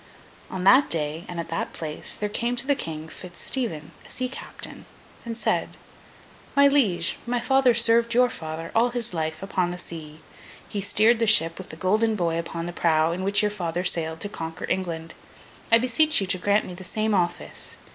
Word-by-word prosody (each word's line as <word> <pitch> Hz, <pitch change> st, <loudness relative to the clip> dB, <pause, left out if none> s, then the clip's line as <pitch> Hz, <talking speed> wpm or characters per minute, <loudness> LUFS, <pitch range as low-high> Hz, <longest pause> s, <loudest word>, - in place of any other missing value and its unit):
On 185 Hz, -1 st, -4 dB
that 260 Hz, +9 st, +6 dB
day, 155 Hz, +1 st, -2 dB
and 175 Hz, -1 st, -5 dB
at 165 Hz, -, -5 dB
that 165 Hz, -, -3 dB
place, 155 Hz, -2 st, -5 dB
there 210 Hz, -, -2 dB
came 235 Hz, +4 st, -1 dB
to 245 Hz, -, -1 dB
the 285 Hz, -, +3 dB
King, 160 Hz, -, -5 dB
Fitz 175 Hz, +2 st, -11 dB
Stephen, 165 Hz, -, -2 dB
a -, -, -16 dB
sea 255 Hz, -, -2 dB
captain, 260 Hz, -, -8 dB, 0.4 s
and 230 Hz, -1 st, -5 dB
said: -, -, -1 dB, 0.8 s
'My 280 Hz, 0 st, +7 dB
liege, 200 Hz, -12 st, +2 dB
my 245 Hz, 0 st, 0 dB
father 260 Hz, 0 st, +3 dB
served 235 Hz, 0 st, +3 dB
your 250 Hz, 0 st, +4 dB
father 160 Hz, -5 st, -6 dB
all 235 Hz, +2 st, +4 dB
his 240 Hz, -4 st, -2 dB
life, 160 Hz, +1 st, -3 dB
upon 185 Hz, -2 st, 0 dB
the 175 Hz, -, -5 dB
sea. 160 Hz, -3 st, -8 dB, 0.5 s
He 205 Hz, -, -3 dB
steered 220 Hz, +4 st, +3 dB
the 230 Hz, -, +2 dB
ship 165 Hz, -6 st, +4 dB
with 190 Hz, -, -9 dB
the -, -, -8 dB
golden 215 Hz, +6 st, +1 dB
boy 170 Hz, -4 st, 0 dB
upon 170 Hz, 0 st, -4 dB
the 175 Hz, -, -5 dB
prow, 160 Hz, -1 st, +2 dB
in 180 Hz, +2 st, -3 dB
which 200 Hz, +2 st, +2 dB
your 210 Hz, -, +1 dB
father 175 Hz, -3 st, -3 dB
sailed 165 Hz, -2 st, +1 dB
to -, -, -2 dB
conquer 165 Hz, -2 st, -6 dB
England. 165 Hz, -3 st, -3 dB, 0.6 s
I 230 Hz, -, +9 dB
beseech 255 Hz, +6 st, +3 dB
you 195 Hz, -, -1 dB
to 185 Hz, 0 st, 0 dB
grant 205 Hz, +3 st, +2 dB
me 180 Hz, -, -7 dB
the 180 Hz, +1 st, -10 dB
same 215 Hz, +3 st, -1 dB
office. 175 Hz, -3 st, -2 dB
185 Hz, 200 wpm, -25 LUFS, 165-230 Hz, 0.8 s, I